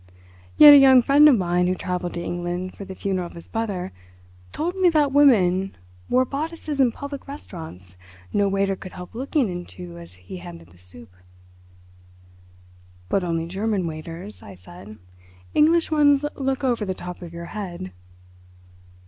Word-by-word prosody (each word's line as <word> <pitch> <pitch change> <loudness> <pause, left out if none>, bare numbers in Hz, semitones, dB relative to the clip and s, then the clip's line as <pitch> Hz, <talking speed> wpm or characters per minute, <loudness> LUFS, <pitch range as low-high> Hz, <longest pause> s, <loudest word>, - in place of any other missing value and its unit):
"Yet 295 -1 +11
a - - +10
young 265 -2 +7
friend 290 +3 +6
of 265 - +5
mine 180 -1 +1
who 185 - 0
travelled 180 -1 -4
to 170 - -4
England 175 +1 -4
for 200 - -9
the 190 - -9
funeral 185 -3 -2
of - - -14
his 170 - -12
brother 200 -5 -3 0.6
told 345 +4 -3
me 375 -2 +4
that 300 -4 +2
women 195 -10 +3 0.3
wore 255 +1 +3
bodices 300 +1 -5
in 255 -3 +4
public 280 +3 -8
restaurants 160 - -10 0.4
no 205 -1 +2
waiter 195 0 0
could 185 0 -11
help 180 0 -10
looking 265 +2 -1
into 90 - -8
as 85 +2 -12
he 90 0 -10
handed 85 -1 -11
the 85 0 -21
soup." 90 +5 -14 2.0
"But 195 - +1
only 165 -2 -2
German 195 +2 -2
waiters," 165 +5 -8
I 100 - -12
said. 90 +4 -13 0.6
"English 325 +2 +3
ones 290 -2 +4
look 270 0 -2
over 240 -4 0
the 190 -2 -3
top 180 0 -8
of 170 -2 -9
your 170 0 -8
head." 175 - -6
190 Hz, 160 wpm, -23 LUFS, 170-270 Hz, 2.0 s, Yet